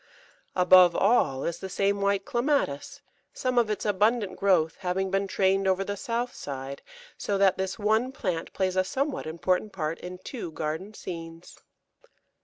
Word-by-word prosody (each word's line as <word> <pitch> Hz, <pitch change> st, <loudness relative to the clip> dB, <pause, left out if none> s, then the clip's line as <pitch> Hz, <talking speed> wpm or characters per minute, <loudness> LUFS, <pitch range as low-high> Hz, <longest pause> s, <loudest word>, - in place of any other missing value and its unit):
Above 180 Hz, -1 st, +7 dB
all 195 Hz, -, +2 dB
is 170 Hz, -, -3 dB
the 190 Hz, -, -6 dB
same 200 Hz, +1 st, 0 dB
white 200 Hz, 0 st, +1 dB
Clematis, 240 Hz, -, -1 dB, 0.3 s
some 255 Hz, -2 st, +1 dB
of 230 Hz, -3 st, +1 dB
its 210 Hz, -, -2 dB
abundant 210 Hz, +1 st, +1 dB
growth 175 Hz, -5 st, +2 dB
having 190 Hz, 0 st, -1 dB
been 195 Hz, 0 st, +1 dB
trained 195 Hz, 0 st, +2 dB
over 190 Hz, 0 st, +2 dB
the 205 Hz, +1 st, -3 dB
south 235 Hz, +4 st, -3 dB
side, 135 Hz, 0 st, -6 dB, 0.4 s
so 200 Hz, -, -1 dB
that 195 Hz, -1 st, +3 dB
this 190 Hz, 0 st, -2 dB
one 220 Hz, +4 st, +1 dB
plant 180 Hz, -10 st, -3 dB
plays 185 Hz, -1 st, -1 dB
a 185 Hz, -, +3 dB
somewhat 275 Hz, -, -2 dB
important 180 Hz, +5 st, 0 dB
part 160 Hz, -3 st, -3 dB
in 180 Hz, 0 st, -7 dB
two 185 Hz, 0 st, -6 dB
garden 160 Hz, +8 st, -4 dB
scenes. 165 Hz, -2 st, -8 dB
190 Hz, 160 wpm, -27 LUFS, 175-210 Hz, 0.4 s, Above